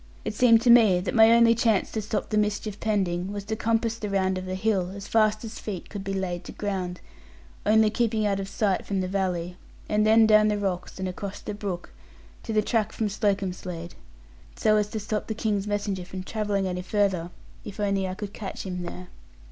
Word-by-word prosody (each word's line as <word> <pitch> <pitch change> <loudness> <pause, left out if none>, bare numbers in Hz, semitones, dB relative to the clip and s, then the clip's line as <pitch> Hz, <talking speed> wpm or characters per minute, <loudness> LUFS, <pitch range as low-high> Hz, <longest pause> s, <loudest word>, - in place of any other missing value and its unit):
It - - -2
seemed 230 0 +5
to 245 - +6
me 220 -7 +6
that 180 - -3
my 225 -1 +7
only 230 0 +6
chance 225 -3 +1
to 220 - -2
stop 210 +1 -3
the 215 - +1
mischief 210 0 -2
pending 190 -4 -1
was 205 -1 -5
to 220 +2 -3
compass 225 0 0
the 210 - -4
round 190 -1 +1
of 185 - -7
the 185 - -3
hill, 190 -2 0
as 200 - -8
fast 215 -1 +2
as 225 0 -7
feet 195 -5 -6
could 200 -2 -5
be 195 0 -3
laid 180 -2 -3
to - - -7
ground; 185 -3 -3 0.7
only 215 0 +5
keeping 220 -2 +1
out 200 -1 +1
of 195 0 -4
sight 200 -3 0
from 195 -2 -2
the 185 - -2
valley, 180 -2 -2 0.3
and 210 0 +2
then 220 +1 +6
down 215 0 +6
the 210 -1 +1
rocks, 190 -3 -3
and 190 0 -3
across 195 +2 -6
the - - -6
brook, 195 -4 -5 0.5
to - - -6
the 215 -1 +2
track 220 -1 0
from 220 -2 -2
Slocombslade: 185 -4 -2 0.6
so 215 - +3
as 210 -1 +1
to 220 - -4
stop 210 +1 -3
the 220 - -3
King's 210 -2 -1
messenger 205 -2 -2
from 185 +1 -7
travelling 205 -1 -1
any 180 -1 -2
farther, 190 -3 0 0.3
if 210 0 -9
only 200 -2 0
I 185 - -4
could 205 0 -6
catch 200 -1 -6
him 180 -1 -4
there. 180 +1 -7
205 Hz, 215 wpm, -26 LUFS, 185-215 Hz, 0.7 s, my